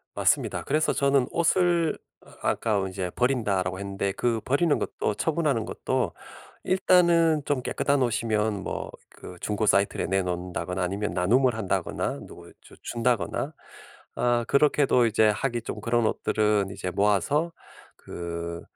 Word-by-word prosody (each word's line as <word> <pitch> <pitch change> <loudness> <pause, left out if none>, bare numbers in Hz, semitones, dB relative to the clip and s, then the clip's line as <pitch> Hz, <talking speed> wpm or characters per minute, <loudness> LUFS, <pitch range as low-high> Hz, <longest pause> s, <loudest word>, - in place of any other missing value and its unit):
맞습니다. - - +1
그래서 155 +3 +1
저는 140 -2 +2
옷을 170 -1 +2 0.5
아까 105 -4 0
이제 95 -1 -4
"버린다."라고 100 -8 0
했는데 100 0 -3
그 115 +2 0
버리는 145 +4 +2
것도 105 - -2
처분하는 150 -5 0
것도 - - -2 0.5
일단은 170 -4 +4
좀 140 -3 -1
깨끗한 140 +1 0
옷이면 110 -3 0
뭐 - - -4 0.3
그 90 - -9
중고 105 +1 -1
사이트에 100 -1 +2
내놓는다거나 90 -1 -2
아니면 100 +3 -2
나눔을 120 +8 +2
한다거나 105 -4 -2
누굴 - - -13
주 - - -17
준다거나 120 -6 -1 0.6
아 120 -1 +1
그렇게도 140 -3 +3
이제 110 -1 +3
하기 120 +2 -2
좀 105 - -6
그런 115 +1 +1
옷들은 105 -2 +1
이제 90 -2 -4
모아서 105 - +1 0.5
그 85 0 -6
110 Hz, 310 characters per minute, -26 LUFS, 100-140 Hz, 0.6 s, 일단은